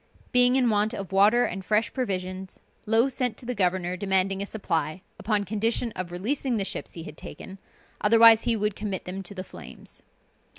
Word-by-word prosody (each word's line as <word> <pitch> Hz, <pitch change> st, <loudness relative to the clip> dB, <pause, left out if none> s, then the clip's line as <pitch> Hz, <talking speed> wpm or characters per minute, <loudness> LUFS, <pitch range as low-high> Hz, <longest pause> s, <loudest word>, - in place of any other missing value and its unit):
Being 250 Hz, 0 st, +5 dB
in 250 Hz, -3 st, +3 dB
want 210 Hz, +3 st, +1 dB
of 195 Hz, -2 st, -6 dB
water 210 Hz, +5 st, +4 dB
and 190 Hz, +1 st, -5 dB
fresh 210 Hz, +2 st, 0 dB
provisions, 185 Hz, -6 st, -4 dB, 0.3 s
Low 225 Hz, +4 st, +4 dB
sent 250 Hz, -4 st, -2 dB
to -, -, -10 dB
the 250 Hz, -, -2 dB
governor 180 Hz, -3 st, 0 dB
demanding 190 Hz, 0 st, +1 dB
a 200 Hz, -, -3 dB
supply, 170 Hz, -4 st, -3 dB, 0.2 s
upon 210 Hz, 0 st, 0 dB
condition 225 Hz, +4 st, 0 dB
of 185 Hz, -3 st, -6 dB
releasing 240 Hz, +7 st, -1 dB
the 200 Hz, -, -1 dB
ships -, -, -5 dB
he 165 Hz, -, -8 dB
had 150 Hz, -, -10 dB
taken, 190 Hz, +5 st, -10 dB, 0.4 s
otherwise 225 Hz, +1 st, +7 dB
he 235 Hz, -, +3 dB
would 210 Hz, -1 st, -1 dB
commit 200 Hz, -3 st, -4 dB
them 185 Hz, +2 st, -5 dB
to 195 Hz, +1 st, -9 dB
the 185 Hz, -, -5 dB
flames. -, -, -10 dB
205 Hz, 185 wpm, -26 LUFS, 185-230 Hz, 0.4 s, otherwise